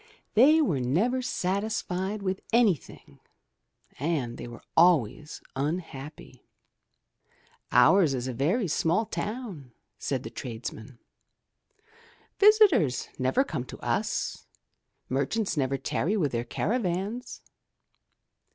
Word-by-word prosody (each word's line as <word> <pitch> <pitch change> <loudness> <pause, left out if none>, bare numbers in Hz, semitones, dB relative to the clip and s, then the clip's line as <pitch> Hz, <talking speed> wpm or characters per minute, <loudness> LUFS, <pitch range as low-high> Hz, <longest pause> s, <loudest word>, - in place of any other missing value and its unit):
They 300 +8 +6
were 155 - 0
never 195 - +1
satisfied 200 -2 -2
with 190 0 -2
anything 200 - 0 0.8
and 140 -5 -1
they - - -6
were 120 0 -11
always 155 -3 +3
unhappy. 150 0 -5 1.3
''Ours 140 +5 +5
is 125 0 -3
only 130 - -3
a 135 +4 -1
very 220 0 +1
small 170 +7 +1
town/' 205 - -5 0.3
said 135 -2 -2
the - - -7
tradesmen. 115 0 -7 1.4
''Visitors 400 - +5
never 130 - +2
come 130 - -4
to - - -10
us, - - -2 0.6
merchants 140 - -1
never 135 -2 0
tarry 160 - -1
with 150 -8 +1
their 120 0 -2
caravans.' 205 - -2
170 Hz, 105 wpm, -27 LUFS, 130-215 Hz, 1.4 s, They